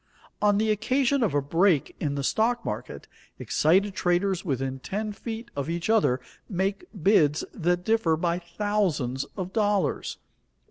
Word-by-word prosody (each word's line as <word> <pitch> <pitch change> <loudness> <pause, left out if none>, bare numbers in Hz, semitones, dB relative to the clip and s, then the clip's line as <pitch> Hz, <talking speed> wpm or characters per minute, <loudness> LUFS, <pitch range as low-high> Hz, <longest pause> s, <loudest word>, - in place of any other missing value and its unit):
On 205 -1 +4
the 215 +1 +2
occasion 260 +5 +1
of 205 -11 +1
a 145 - +2
break 165 0 +2
in 145 -2 -1
the 140 - -2
stock 230 - +1
market, - - -5 0.3
excited 190 +6 +2
traders 185 +1 +1
within 135 -5 -2
ten 210 +9 -3
feet 230 +2 -7
of 140 +2 -3
each 170 +5 -1
other 195 - +3 0.3
make 195 - -1 0.2
bids 155 -7 +4
that 175 +1 0
differ 220 -8 +2
by 170 +1 0
thousands 170 -8 -1
of 185 -1 -4
dollars. 205 -3 0
190 Hz, 145 wpm, -26 LUFS, 160-210 Hz, 0.3 s, On